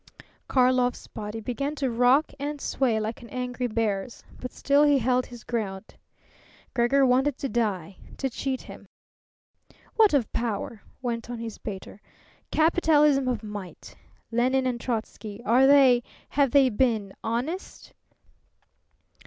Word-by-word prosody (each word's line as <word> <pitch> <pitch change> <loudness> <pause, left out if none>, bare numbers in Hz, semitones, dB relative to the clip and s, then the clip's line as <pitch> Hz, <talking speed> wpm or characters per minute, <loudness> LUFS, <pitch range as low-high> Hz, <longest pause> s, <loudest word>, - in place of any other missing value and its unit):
Karlov's 250 -1 +2
body 210 0 -6
began 275 +6 -3
to 270 -4 -1
rock 250 +6 +3
and 290 +1 -4
sway 245 -5 0
like 220 +3 -4
an 235 - -12
angry 250 0 -3
bear's; 215 -1 -2 0.2
but 250 - -6
still 285 +1 +2
he 290 -1 +5
held 250 0 +1
his 240 -2 -11
ground. 205 -4 -4 0.8
Gregor 265 +3 +3
wanted 260 +2 +2
to 275 - -3
die, 200 -8 -1 0.2
to 270 - -1
cheat 260 +1 -3
him. - - -12 1.1
"What 430 -8 +5
of 250 -6 0
power?" 225 -1 -3 0.2
went 235 -1 -3
on 240 - -4
his 230 -2 -7
baiter. 200 0 -8 0.5
"Capitalism 300 -4 +3
of 240 -4 -1
might. 205 -4 -8 0.4
Lenine 255 +3 +2
and 245 -2 -1
Trotzky; 220 -3 -4
are 250 +4 +5
they 270 -3 +6 0.3
have 280 -1 +2
they 270 0 +5
been 220 -4 0
honest? 255 +12 -4
245 Hz, 135 wpm, -26 LUFS, 225-270 Hz, 1.1 s, they